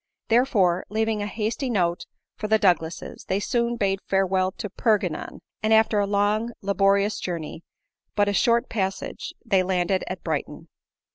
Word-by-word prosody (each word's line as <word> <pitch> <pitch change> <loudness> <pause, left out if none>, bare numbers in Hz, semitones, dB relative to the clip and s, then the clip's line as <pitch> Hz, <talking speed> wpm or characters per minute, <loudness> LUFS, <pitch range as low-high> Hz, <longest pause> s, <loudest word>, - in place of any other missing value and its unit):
Therefore, 210 -7 +3
leaving 220 0 0
a 205 - -2
hasty 225 +5 -2
note 175 -6 0 0.3
for 210 - -4
the 220 +1 +4
Douglases, 175 -5 0
they 190 - 0
soon 235 +2 0
bade 195 -3 0
farewell 190 -1 +1
to - - -5
Perpignan; 200 -5 -1 0.2
and 215 - 0
after 220 -1 +4
a 200 - +1
long, 210 +3 +1
laborious 200 +1 +2
journey, 165 -2 -5 0.5
but 205 -1 +3
a 205 - +1
short 235 +3 +3
passage, 195 -3 -3
.they 190 -1 +3
landed 185 0 0
at 185 -1 -6
Brighton. 160 0 -4
200 Hz, 150 wpm, -24 LUFS, 185-220 Hz, 0.5 s, the